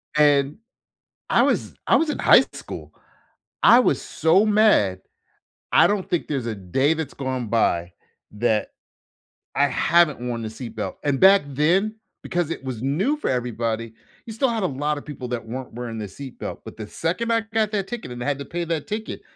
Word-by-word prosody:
And, 145 Hz, -1 st, +3 dB, 0.7 s
I -, -, +4 dB
was -, -, 0 dB
I -, -, +6 dB
was 325 Hz, -, +1 dB
in 300 Hz, -, -2 dB
high -, -, +7 dB
school, -, -, -9 dB, 0.7 s
I 240 Hz, -, +8 dB
was 255 Hz, -, +2 dB
so 165 Hz, +6 st, +2 dB
mad. 205 Hz, -, +3 dB, 0.7 s
I -, -, +6 dB
don't 205 Hz, -2 st, -1 dB
think 175 Hz, -, -1 dB
there's 135 Hz, -5 st, -2 dB
a 115 Hz, -, -2 dB
day 120 Hz, -, +1 dB
that's 160 Hz, -2 st, -5 dB
gone 130 Hz, -3 st, -3 dB
by 85 Hz, -6 st, +1 dB, 0.4 s
that 110 Hz, 0 st, 0 dB, 0.9 s
I -, -, +4 dB
haven't 170 Hz, -5 st, +3 dB
worn 120 Hz, -1 st, -3 dB
the 110 Hz, -, -4 dB
seat 115 Hz, 0 st, -8 dB
belt. 110 Hz, -, -4 dB
And 140 Hz, -2 st, 0 dB
back 195 Hz, -1 st, +7 dB
then, 170 Hz, +10 st, +1 dB, 0.3 s
because 175 Hz, -3 st, -1 dB
it 165 Hz, -, -5 dB
was 130 Hz, -4 st, -5 dB
new 175 Hz, -, 0 dB
for 300 Hz, -, -2 dB
everybody, 115 Hz, -2 st, -2 dB, 0.3 s
you 225 Hz, -, -7 dB
still 255 Hz, +4 st, +1 dB
had 225 Hz, -3 st, -1 dB
a -, -, +2 dB
lotta 145 Hz, +1 st, -2 dB
people 140 Hz, -4 st, -7 dB
that 120 Hz, -2 st, -4 dB
weren't 125 Hz, +2 st, -6 dB
wearing 115 Hz, -1 st, -5 dB
the 105 Hz, -, -4 dB
seat 130 Hz, +7 st, -10 dB
belt, -, -, -6 dB
but -, -, -9 dB
the 110 Hz, -2 st, -6 dB
second 185 Hz, -, -2 dB
I 230 Hz, 0 st, +3 dB
got 220 Hz, -1 st, +1 dB
that 200 Hz, -3 st, -1 dB
ticket, 240 Hz, -, -6 dB
and 120 Hz, -, -7 dB
had 140 Hz, +1 st, -1 dB
to 140 Hz, -, -6 dB
pay 175 Hz, +5 st, -4 dB
that 165 Hz, +1 st, -3 dB
ticket, 220 Hz, 0 st, -5 dB
145 Hz, 190 wpm, -23 LUFS, 120-190 Hz, 0.9 s, I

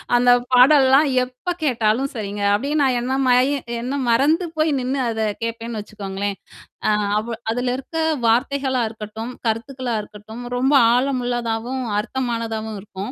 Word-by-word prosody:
அந்த 245 Hz, 0 st, +5 dB, 0.2 s
பாடல்லாம் 270 Hz, +2 st, +6 dB, 0.2 s
எப்ப 255 Hz, +8 st, -5 dB
கேட்டாலும் 245 Hz, 0 st, +1 dB
சரிங்க. 205 Hz, -1 st, -4 dB
அப்பிடியே 280 Hz, +9 st, 0 dB
நான் 260 Hz, -3 st, +2 dB
என்ன 260 Hz, +2 st, -1 dB
மய 250 Hz, 0 st, +5 dB, 0.4 s
என்ன 275 Hz, +3 st, -3 dB
மறந்து 300 Hz, +9 st, +3 dB
போய் 310 Hz, 0 st, +2 dB
நின்னு 260 Hz, +2 st, -2 dB
அத 220 Hz, -, -3 dB, 0.2 s
கேட்பேன்னு 230 Hz, 0 st, -4 dB
வச்சுக்கோங்களேன். 200 Hz, -1 st, -5 dB, 0.5 s
அ -, -, +4 dB, 0.3 s
அவ 230 Hz, +2 st, -4 dB, 0.2 s
அதுல 245 Hz, +1 st, -1 dB
இருக்க 270 Hz, +5 st, -7 dB, 0.3 s
வார்த்தைகளா 260 Hz, +2 st, +1 dB
இருக்கட்டும், 220 Hz, +2 st, -7 dB, 0.2 s
கருத்துக்களா 240 Hz, +1 st, -2 dB
இருக்கட்டும், 220 Hz, +3 st, -10 dB
ரொம்ப 265 Hz, +3 st, +2 dB, 0.2 s
ஆழமுள்ளதாவும், 245 Hz, -1 st, -1 dB, 0.2 s
அர்த்தமானதாவும் 225 Hz, -3 st, -3 dB
இருக்கும். 200 Hz, +2 st, -7 dB
245 Hz, 130 wpm, -21 LUFS, 220-265 Hz, 0.5 s, பாடல்லாம்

